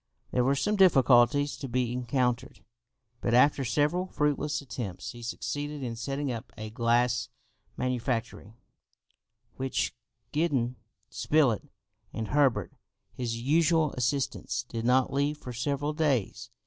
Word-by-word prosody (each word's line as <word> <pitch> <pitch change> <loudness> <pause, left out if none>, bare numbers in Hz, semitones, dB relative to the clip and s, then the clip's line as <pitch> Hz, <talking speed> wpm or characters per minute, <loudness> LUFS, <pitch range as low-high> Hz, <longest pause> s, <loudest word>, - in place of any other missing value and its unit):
There 125 - +2
were 135 +2 +3
some 210 +10 0
difficulties 145 -5 +5
to 135 - -6
be 125 -1 0
encountered, 125 0 -1 0.6
but 120 - +1
after 140 +2 +5
several 150 +8 +1
fruitless 150 -2 0
attempts, 120 -9 -6
he 120 - -11
succeeded 145 +4 -4
in 120 -2 -3
setting 135 +4 -3
up 120 +1 -6
a 110 0 -6
glass 120 -1 +1 0.5
manufactory, 120 -4 -2 1.0
which 135 0 -1 0.4
Gideon 135 -6 0 0.3
Spilett 145 -3 +1 0.4
and 110 -1 -4
Herbert, 130 -9 +2 0.4
his 115 -2 -3
usual 160 +4 +3
assistants 130 0 -1
did 115 -2 -5
not 130 +1 +3
leave 145 +2 +1
for 125 -4 -8
several 140 +4 -1
days. 145 - 0
130 Hz, 120 wpm, -28 LUFS, 120-145 Hz, 1.0 s, difficulties